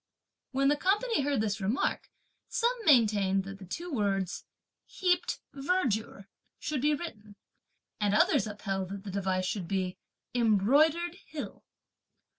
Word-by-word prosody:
When 275 +1 +1
the 295 - +4
company 420 +4 +1
heard 275 -5 +1
his 210 -1 -2
remark, 210 +8 -1 0.4
some 485 0 +2
maintained 205 -8 +4
that 195 0 -8
the 190 - -10
two 345 - -5
words 195 -5 -1 0.4
"Heaped 360 -2 0
verdure" 265 - -1 0.3
should 290 -3 -2
be 300 +1 +3
written; 215 -10 -8 0.6
and 205 -1 +2
others 210 - +4
upheld 195 -3 -3
that 195 0 -6
the 200 - -6
device 185 -1 0
should 185 -2 -2
be 185 -1 -2 0.3
"Embroidered 285 - +3
Hill." 300 -2 -7
215 Hz, 130 wpm, -30 LUFS, 195-300 Hz, 0.6 s, the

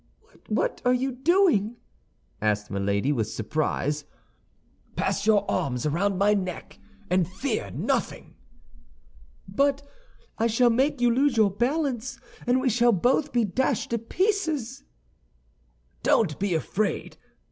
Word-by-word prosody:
"What - - -1
are 250 0 +3
you 265 +2 -1
doing?" 265 - +2 0.7
asked 105 -1 0
Milady, 100 +6 0
with 115 -6 -1
surprise. 150 +5 -2 0.9
"Pass 200 +2 -1
your 205 -2 +4
arms 125 -1 -1
around 180 +6 0
my 205 +2 +4
neck, 185 -4 -4 0.3
and 180 -2 +3
fear 195 - -3
nothing." 90 - -2 1.1
"But 275 +8 +1 0.6
I 230 - +3
shall 235 +2 +3
make 265 +3 +1
you 240 -1 +4
lose 265 0 +2
your 210 -3 +4
balance, 255 - -1 0.3
and 250 +1 +3
we 260 - -1
shall 240 0 +4
both 255 - +1
be 240 -1 +2
dashed 250 +4 -1
to 235 - 0
pieces." 320 - -1 1.2
"Don't 175 -10 +2
be 195 -3 0
afraid. 200 +6 -2
225 Hz, 125 wpm, -26 LUFS, 180-260 Hz, 1.2 s, your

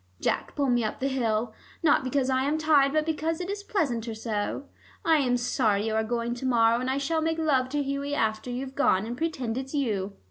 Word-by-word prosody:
Jack, - - -1
pull 280 -2 +1
me 240 -1 +2
up 215 - -3
the 270 - 0
hill, 230 -4 0 0.3
not 300 -4 +4
because 260 0 0
I 260 0 +2
am 295 +2 +1
tired, 300 -3 +4
but 310 +1 +1
because 320 0 -1
it 360 +2 -3
is 405 0 -4
pleasanter 245 - -1
so. 220 +4 -3 0.4
I 325 -2 +5
am 250 -4 +2
sorry 220 -4 +1
you 220 - -1
are 220 0 +1
going 235 +1 -2
to 245 +2 -6
morrow, 230 -1 +4
and 255 +1 -2
I 265 - 0
shall 315 +3 0
make 325 +1 0
love 275 -5 +1
to 290 +1 -1
Hughie 280 +1 -2
after 220 -1 -1
you've 260 +2 -4
gone 215 -8 +2
and 235 +2 -4
pretend 260 -6 -2
it's 270 +2 -6
you. 205 -8 -1
260 Hz, 225 wpm, -27 LUFS, 230-295 Hz, 0.4 s, I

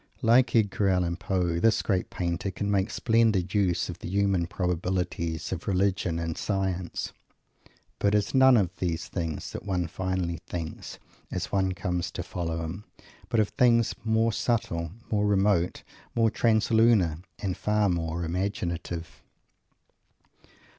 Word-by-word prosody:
Like 120 +3 +4
Edgar 100 -2 +2
Allan 90 -2 +1
Poe, 90 -3 -1
this 115 +4 +3
great 95 -3 0
painter 90 +2 -2
can 100 +2 -3
make 100 +1 +1
splendid 110 -6 +2
use 90 -5 +1
of 90 -1 -7
the - - -6
human 100 -3 +1
probabilities 90 -2 -2
of 90 -2 -5
Religion 95 -3 +1
and 85 -1 -3
Science; 95 -3 -2 0.9
but 100 +1 +2
it - - +6
is 105 - -2
none 130 -1 +7
of 90 -3 0
these 85 -2 -2
things 85 -4 -4
that - - -6
one 90 -3 -1
finally 90 -1 -2
thinks, 80 -2 -6 0.3
as - - -4
one 95 -2 +1
comes 90 -2 -2
to - - -4
follow 85 -2 -3
him, 85 +6 -5 0.5
but 115 - +2
of 105 - +2
things 115 -2 +3
more 110 0 +2
subtle, 85 -9 -1 0.2
more 105 -1 +2
remote, 100 -3 +2 0.3
more 115 -1 +3
translunar, 110 -7 +3 0.2
and 95 -4 -2
far 105 -1 +1
more 85 -1 -1
imaginative. 85 -2 -3
95 Hz, 140 wpm, -27 LUFS, 85-105 Hz, 0.9 s, none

